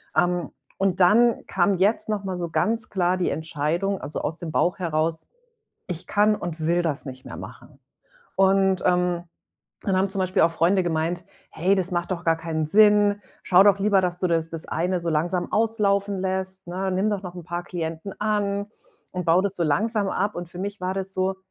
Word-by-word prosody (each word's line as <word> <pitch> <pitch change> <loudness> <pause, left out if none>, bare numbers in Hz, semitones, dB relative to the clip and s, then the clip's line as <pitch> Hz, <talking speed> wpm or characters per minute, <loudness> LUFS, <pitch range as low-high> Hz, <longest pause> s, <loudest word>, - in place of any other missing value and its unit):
Ähm, 175 -3 +1 0.3
und 190 -1 0
dann 225 +6 +4
kam 195 +2 +2
jetzt 195 +5 +1
noch 210 -2 -2
mal 190 -2 -3
so 170 -1 -3
ganz 220 +7 -1
klar 185 -2 +1
die 180 - 0
Entscheidung, 160 +5 -1
also 145 - -5
aus 160 - -3
dem 170 -3 -6
Bauch 175 +3 +1
heraus, 165 -2 -1 0.6
ich 175 -1 -5
kann 210 +1 +3
und 170 -4 -6
will 175 +1 +2
das 150 -4 -2
nicht 130 -1 -9
mehr - - -8
machen. - - -11 0.6
Und, 190 -1 +3
ähm, 180 -1 +1 0.6
dann 195 -2 0
haben 190 +1 +2
zum 195 +1 -3
Beispiel 185 -2 +2
auch 165 - +4
Freunde 175 +4 +2
gemeint: 170 +1 -1 0.3
„Hey, 190 +5 +1
das 185 -1 -1
macht 175 +1 -2
doch 175 -2 -3
gar 165 -1 +4
keinen 160 -1 -2
Sinn, 205 +2 +5 0.2
schau 185 +1 +6
doch 200 -1 +5
lieber, 200 -1 +3
dass 180 -1 -2
du 185 - 0
das 165 -2 0
das 165 -1 -5
eine 180 +3 -1
so 170 - -3
langsam 170 +3 -1
auslaufen 205 -3 +1
lässt.“ 190 0 -3
Ne? 185 +2 -3
Nimm 190 +3 +1
doch 205 -2 -2
noch 180 -1 -8
'n 175 - -8
paar 175 +1 -4
Klienten 165 +2 -5
an 205 -1 0 0.5
und 180 -1 -3
bau 165 +2 +4
das 200 0 -2
so 170 - -1
langsam 205 +6 +1
ab. 200 +2 -1
Und 175 -1 -6
für 175 - -10
mich 200 +1 -5
war 185 +1 -2
das 195 0 -4
so: 190 +1 0
185 Hz, 205 wpm, -24 LUFS, 170-195 Hz, 0.6 s, schau